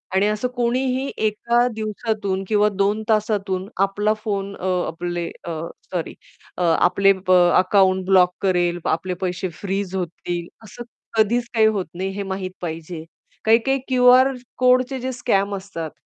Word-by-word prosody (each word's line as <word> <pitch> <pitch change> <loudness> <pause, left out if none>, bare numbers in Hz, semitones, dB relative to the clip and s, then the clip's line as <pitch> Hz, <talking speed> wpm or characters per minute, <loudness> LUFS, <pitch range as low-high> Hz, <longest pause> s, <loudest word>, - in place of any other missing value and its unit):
आणि 195 +2 +3
असं 215 +3 -1
कोणीही 255 +2 0 0.2
एका 235 +3 +1
दिवसातून 215 -3 -2
किंवा 210 0 +3
2 200 +2 0
तासातून 205 -3 0 0.2
आपला 205 +2 0
फोन 200 -2 -3
अ, 185 - -5 0.2
आपले 175 +1 -4 0.2
अ, 170 - -4 0.4
सॉरी 175 -3 -3 0.4
अ, - - -3
आपले 180 +4 +4
अ, 185 - +5 0.2
अकाउंट 185 0 +3
ब्लॉक 185 -1 +4
करेल 175 -2 +1
आपले, 180 +3 -1
पैसे 185 0 -2
फ्रीज 195 -1 -3
होतील 175 -1 -4 0.2
असं 210 +3 -9 0.3
कधीच 235 +3 +2
काही 220 -1 +4
होत 205 -4 0
नाही, 190 +2 -2
हे 200 +1 -4
माहीत 190 -1 -4
पाहिजे. 165 -1 -6 0.4
काही-काही 235 +5 +3
क्यूआर 255 +1 +5 0.2
कोडचे 255 +1 +3
जे 260 +1 -3
स्कॅम 200 -5 0
असतात, 180 -5 -6
200 Hz, 140 wpm, -21 LUFS, 185-225 Hz, 0.4 s, अ